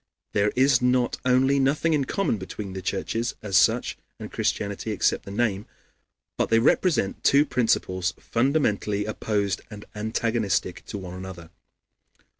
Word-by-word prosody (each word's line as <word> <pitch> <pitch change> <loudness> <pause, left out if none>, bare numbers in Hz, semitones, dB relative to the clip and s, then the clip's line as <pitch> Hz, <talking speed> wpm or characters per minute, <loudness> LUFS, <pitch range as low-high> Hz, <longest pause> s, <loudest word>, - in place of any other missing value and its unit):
There 105 +1 +2
is 130 0 +4
not 125 0 +2
only 130 +2 +3
nothing 150 +4 +2
in 145 -3 +1
common 195 - 0
between 95 +1 -7
the 95 - -5
churches 115 +5 -2
as 100 -3 -3
such - - +3 0.2
and - - -8
Christianity, 100 +1 -2
except 105 - 0
the - - -8
name, 105 -1 -1 0.7
but - - 0
they 115 - +4
represent 120 - +2
two 140 +2 +5
principles 95 - 0
fundamentally 110 -6 0
opposed 105 -2 -1
and 105 -2 -10
antagonistic 110 -3 -1
to - - -5
one 90 -2 -7
another. 90 -2 -9
110 Hz, 140 wpm, -25 LUFS, 100-125 Hz, 0.7 s, two